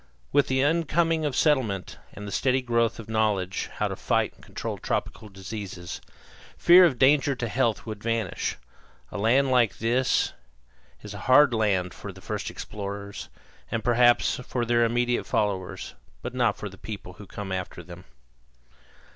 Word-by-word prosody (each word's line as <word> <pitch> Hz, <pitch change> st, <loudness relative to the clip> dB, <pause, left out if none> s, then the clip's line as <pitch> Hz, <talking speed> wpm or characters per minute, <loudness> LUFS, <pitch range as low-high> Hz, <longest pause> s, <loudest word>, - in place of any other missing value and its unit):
With 145 Hz, -, +3 dB
the 130 Hz, 0 st, +1 dB
incoming 165 Hz, +1 st, +2 dB
of 145 Hz, -4 st, -1 dB
settlement 125 Hz, -, +1 dB
and 105 Hz, -, -8 dB
with 100 Hz, -, -6 dB
the -, -, 0 dB
steady 130 Hz, 0 st, +2 dB
growth 115 Hz, -1 st, +1 dB
of 115 Hz, -, -9 dB
knowledge 105 Hz, -4 st, 0 dB
how -, -, 0 dB
to -, -, -4 dB
fight -, -, 0 dB
and -, -, -22 dB
control -, -, -5 dB
tropical 110 Hz, -, -3 dB
diseases, 95 Hz, -2 st, -7 dB, 0.6 s
fear 180 Hz, +1 st, +8 dB
of 140 Hz, -7 st, +1 dB
danger 140 Hz, +2 st, +4 dB
to 120 Hz, -1 st, -3 dB
health 115 Hz, -1 st, 0 dB
would 110 Hz, -2 st, -6 dB
vanish. 115 Hz, -4 st, -2 dB, 0.5 s
A -, -, -5 dB
land 130 Hz, +6 st, +3 dB
like 120 Hz, -5 st, +3 dB
this 120 Hz, +3 st, +1 dB, 0.7 s
is 105 Hz, -, -8 dB
a 100 Hz, -, -7 dB
hard 130 Hz, 0 st, +7 dB
land 95 Hz, -6 st, +1 dB
for -, -, -8 dB
the -, -, -14 dB
first -, -, -4 dB
explorers, 100 Hz, -1 st, -7 dB, 0.4 s
and 115 Hz, -1 st, -2 dB
perhaps 120 Hz, 0 st, +4 dB
for 125 Hz, -1 st, -3 dB
their 120 Hz, 0 st, +3 dB
immediate 120 Hz, +1 st, 0 dB
followers, 95 Hz, -3 st, -2 dB, 0.3 s
but -, -, -5 dB
not 125 Hz, -1 st, +1 dB
for 105 Hz, -, -5 dB
the 95 Hz, -1 st, -12 dB
people 100 Hz, -4 st, -7 dB
who 105 Hz, -, -10 dB
come 100 Hz, -2 st, -7 dB
after 90 Hz, -1 st, -4 dB
them. 90 Hz, +2 st, -12 dB
115 Hz, 165 wpm, -26 LUFS, 100-130 Hz, 0.7 s, fear